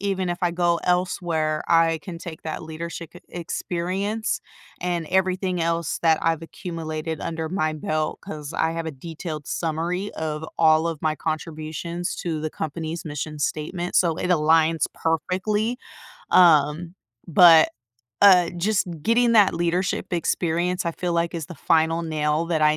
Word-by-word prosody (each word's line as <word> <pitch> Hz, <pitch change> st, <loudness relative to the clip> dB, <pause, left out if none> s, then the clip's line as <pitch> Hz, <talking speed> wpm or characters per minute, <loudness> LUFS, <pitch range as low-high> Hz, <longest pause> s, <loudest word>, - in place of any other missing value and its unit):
even 190 Hz, -2 st, -1 dB
if 175 Hz, -, -3 dB
I 175 Hz, -, +3 dB
go 170 Hz, -1 st, +2 dB
elsewhere, 175 Hz, -4 st, 0 dB
I 165 Hz, -1 st, +4 dB
can 180 Hz, -3 st, -7 dB
take 165 Hz, -2 st, -9 dB
that 155 Hz, -, -4 dB
leadershi 165 Hz, +1 st, -7 dB
k 175 Hz, -, -14 dB
experience, 185 Hz, +5 st, -2 dB, 0.4 s
and 175 Hz, -2 st, -2 dB
everything 185 Hz, -1 st, +1 dB
else 165 Hz, -1 st, -1 dB
that 160 Hz, -1 st, +4 dB
I've 165 Hz, -1 st, +1 dB
accumulated 160 Hz, -2 st, -5 dB
under 160 Hz, -1 st, -3 dB
my 155 Hz, -4 st, 0 dB
belt, 155 Hz, 0 st, -2 dB
'cause 150 Hz, -2 st, -7 dB
I 160 Hz, -, +1 dB
have 165 Hz, 0 st, -4 dB
a -, -, -2 dB
detailed 155 Hz, +1 st, -7 dB
summary 170 Hz, +4 st, -2 dB
of 155 Hz, -1 st, -4 dB
all 160 Hz, 0 st, +5 dB
of 160 Hz, -2 st, -5 dB
my 155 Hz, -1 st, +1 dB
contributions 160 Hz, +2 st, -4 dB
to 160 Hz, -3 st, -2 dB
the 155 Hz, 0 st, -3 dB
company's 160 Hz, +2 st, -5 dB
mission 150 Hz, 0 st, -5 dB
statement, 175 Hz, +5 st, -3 dB
so 170 Hz, -3 st, +3 dB
it -, -, -2 dB
aligns 160 Hz, -1 st, +3 dB
perfectly, 190 Hz, +8 st, -1 dB, 0.5 s
um 165 Hz, 0 st, +4 dB, 0.3 s
but, 165 Hz, -1 st, +7 dB, 0.5 s
uh, 180 Hz, -4 st, +7 dB
just 205 Hz, +3 st, +1 dB, 0.2 s
getting 235 Hz, +3 st, +3 dB
that 210 Hz, -4 st, +6 dB
leadership 175 Hz, +2 st, -1 dB
experience, 175 Hz, +1 st, 0 dB
I 170 Hz, -, 0 dB
feel 175 Hz, +1 st, -2 dB
like, 170 Hz, 0 st, 0 dB
is 160 Hz, -3 st, -4 dB
the 175 Hz, -, -9 dB
final 165 Hz, +2 st, +2 dB
nail 155 Hz, 0 st, 0 dB
that 165 Hz, -2 st, 0 dB
I 150 Hz, 0 st, +4 dB
165 Hz, 155 wpm, -24 LUFS, 155-180 Hz, 0.5 s, but